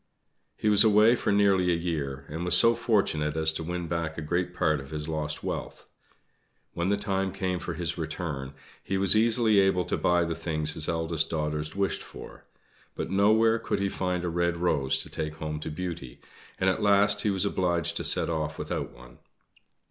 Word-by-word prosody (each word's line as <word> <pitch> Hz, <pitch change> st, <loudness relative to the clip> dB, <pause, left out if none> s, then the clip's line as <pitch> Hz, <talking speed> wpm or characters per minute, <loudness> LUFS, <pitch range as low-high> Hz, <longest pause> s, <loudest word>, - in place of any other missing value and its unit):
He -, -, -2 dB
was 105 Hz, -1 st, +6 dB
away 110 Hz, +2 st, +5 dB
for -, -, -1 dB
nearly 100 Hz, -3 st, +3 dB
a -, -, +2 dB
year, 75 Hz, -6 st, -3 dB
and 80 Hz, +3 st, -5 dB
was 90 Hz, 0 st, +5 dB
so 115 Hz, +4 st, +6 dB
fortunate 90 Hz, -, 0 dB
as 80 Hz, 0 st, +3 dB
to 80 Hz, -, -4 dB
win 90 Hz, +1 st, -4 dB
back 85 Hz, -1 st, -3 dB
a 80 Hz, -, -4 dB
great 90 Hz, +3 st, -1 dB
part 80 Hz, -4 st, +1 dB
of 70 Hz, 0 st, -10 dB
his 75 Hz, +1 st, -5 dB
lost 75 Hz, -1 st, -3 dB
wealth. -, -, -6 dB, 0.8 s
When 85 Hz, +2 st, -1 dB
the 100 Hz, -, +2 dB
time 95 Hz, -2 st, -1 dB
came 95 Hz, -1 st, -2 dB
for -, -, -5 dB
his 85 Hz, -1 st, -3 dB
return, 75 Hz, -4 st, -4 dB, 0.3 s
he 95 Hz, -, -2 dB
was 95 Hz, +1 st, +3 dB
easily 110 Hz, -1 st, +3 dB
able 95 Hz, -2 st, +2 dB
to -, -, -1 dB
buy 90 Hz, -1 st, +2 dB
the 85 Hz, 0 st, -2 dB
things 80 Hz, -2 st, -2 dB
his 75 Hz, -, -1 dB
eldest 80 Hz, -1 st, -1 dB
daughters 75 Hz, -1 st, -2 dB
wished 100 Hz, -1 st, 0 dB
for; -, -, -12 dB, 0.5 s
but -, -, -4 dB
nowhere 110 Hz, +3 st, +4 dB
could -, -, -2 dB
he 100 Hz, 0 st, 0 dB
find 90 Hz, -2 st, -2 dB
a 90 Hz, -, -1 dB
red 85 Hz, 0 st, 0 dB
rose 75 Hz, -6 st, +1 dB
to -, -, -12 dB
take 75 Hz, 0 st, -4 dB
home 75 Hz, -1 st, -5 dB
to 75 Hz, -, -5 dB
Beauty, 80 Hz, -5 st, -6 dB, 0.4 s
and 95 Hz, -, +1 dB
at 95 Hz, +3 st, +1 dB
last 100 Hz, 0 st, +3 dB
he 105 Hz, -, 0 dB
was 95 Hz, 0 st, +1 dB
obliged 90 Hz, -4 st, 0 dB
to -, -, -2 dB
set -, -, +2 dB
off 80 Hz, -1 st, -3 dB
without -, -, -4 dB
one. 60 Hz, +1 st, -16 dB
85 Hz, 200 wpm, -27 LUFS, 80-95 Hz, 0.8 s, was